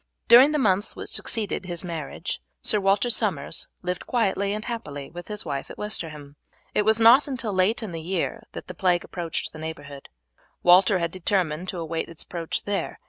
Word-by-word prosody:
During 255 +5 +8
the 305 - +1
months 205 -6 +1
which - - -5
succeeded 205 -4 -1
his 175 0 -2
marriage 165 0 -5 0.2
Sir 210 - +4
Walter 200 +5 +2
Somers 190 -10 -1 0.2
lived 180 0 -4
quietly 200 -4 +1
and 215 +1 -4
happily 145 - -6
with 175 +1 -9
his 210 -1 -5
wife 140 -3 -4
at - - -10
Westerham. 150 -8 -4 0.4
It 210 - +2
was 220 +1 +4
not 240 +6 +7
until 250 -6 -3
late 190 +5 +2
in 210 - -5
the 165 -1 -5
year 185 +6 -2
that - - -7
the 180 - -8
plague 175 -1 +1
approached 170 -3 -3
the 155 - -9
neighbourhood. 145 -3 -8 0.5
Walter 185 +2 +6
had 170 -2 -1
determined 180 -2 -1
to 185 - -4
await 165 0 -3
its 170 - -6
approach 170 -2 -3
there. 205 -1 -3
185 Hz, 190 wpm, -25 LUFS, 165-210 Hz, 0.5 s, During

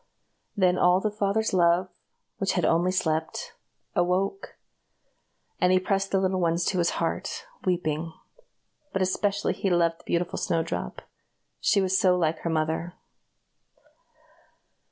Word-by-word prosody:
Then 185 -2 +3
all 180 +1 +5
the 215 +2 -1
father's 210 +1 0
love, 175 0 +3 0.5
which 195 - 0
had 180 - +1
only 170 +2 +2
slept, 160 - -2 0.4
awoke, 185 - -1 1.0
and 180 - +3
he 185 - +5
pressed 195 +1 0
the 195 - +2
little 190 0 0
ones 170 0 +1
to 185 - 0
his 170 0 +2
heart, - - -3 0.2
weeping; 165 -3 -1 0.8
but 190 - +1
especially 200 +2 0
he 195 - -1
loved 170 -2 +2
the - - -19
beautiful 175 0 -1
Snowdrop, 165 - -2 0.6
she 200 - +3
was 190 0 +2
so 180 -1 +4
like 160 -2 0
her 170 - -3
mother. 160 +2 -1
180 Hz, 135 wpm, -26 LUFS, 170-190 Hz, 1.0 s, all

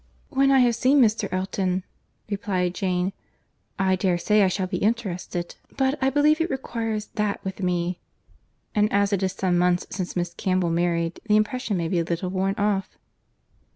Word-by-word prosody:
"When 275 -1 +3
I 270 -1 +5
have 240 -1 +4
seen 265 +5 +3
Mr. 215 -4 +2
Elton," 185 0 -1 0.4
replied 195 -4 -1
Jane, 185 0 -1 0.6
"I 190 -1 +2
dare 185 -1 +1
say 210 +4 +3
I 195 - +5
shall 185 +1 -1
be 185 0 -3
interested—but 215 +6 -2
I 265 - +3
believe 300 +3 +3
it 330 - 0
requires 225 -5 -3
that 210 -2 -1
with 190 +1 -5
me. 180 -1 -1 0.7
And 210 0 +2
as 200 0 +2
it 200 - +1
is 190 -1 0
some 185 -2 +1
months 180 0 +2
since 185 -3 -4
Miss 175 -1 -2
Campbell 185 -2 0
married, 170 0 0
the 210 - +4
impression 215 -1 0
may 170 -1 -1
be 175 +1 0
a - - +1
little 175 +2 -3
worn 195 +1 0
off." 200 -2 -1
195 Hz, 175 wpm, -24 LUFS, 180-215 Hz, 0.7 s, I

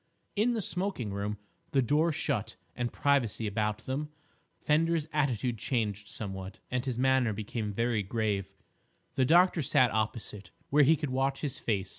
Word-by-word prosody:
In 225 +4 +2
the 220 -3 -1
smoking 180 - -2
room, 100 +1 -2 0.4
the 135 - +4
door 150 +7 +3
shut 105 -8 -2 0.2
and 120 -1 -2
privacy 130 -6 +1
about 105 +1 -1
them, 145 +3 -2 0.5
Fender's 160 +1 +2
attitude 125 -6 0
changed 105 -4 -1
somewhat, 95 -2 -6
and 125 -1 0
his 130 -3 -3
manner 130 -3 +3
became 105 +1 -3
very 115 +1 0
grave. 100 -1 -1 0.6
The 130 - +2
doctor 175 +3 +5
sat 125 -3 +3
opposite, 105 -3 -3 0.2
where 150 +2 +6
he 150 +3 +6
could 150 -3 -3
watch 135 +1 0
his 140 -3 -3
face. 95 -4 -1
120 Hz, 155 wpm, -30 LUFS, 105-145 Hz, 0.6 s, where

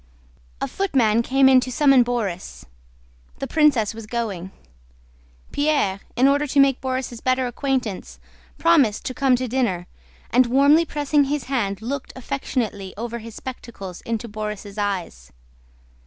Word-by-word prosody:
A - - -2
footman 245 - +2
came 265 +3 +3
in 260 -1 +7
to 255 0 -4
summon 270 -1 +5
Borís—the 220 -7 -4 0.8
princess 275 -8 +3
was 225 -1 -9
going. 210 -6 -3 1.0
Pierre, 285 -10 +1 0.2
in 255 +3 +4
order 285 +2 +2
to 280 +1 +1
make 275 -2 +4
Borís' 255 -2 -3
better 255 0 +1
acquaintance, 250 -4 -3 0.4
promised 290 -11 +3
to 255 - -3
come 270 -2 +3
to 255 +1 -2
dinner, 230 -8 -1 0.5
and 250 +1 +4
warmly 280 +6 +5
pressing 290 -1 +1
his 285 0 -2
hand 220 -6 -2
looked 270 +3 -4
affectionately 240 -7 -3
over 235 +1 -4
his 225 -1 -10
spectacles 220 -8 -8
into 230 0 -3
Borís' 210 -2 -6
eyes. 180 - -3
245 Hz, 135 wpm, -22 LUFS, 215-275 Hz, 1.0 s, in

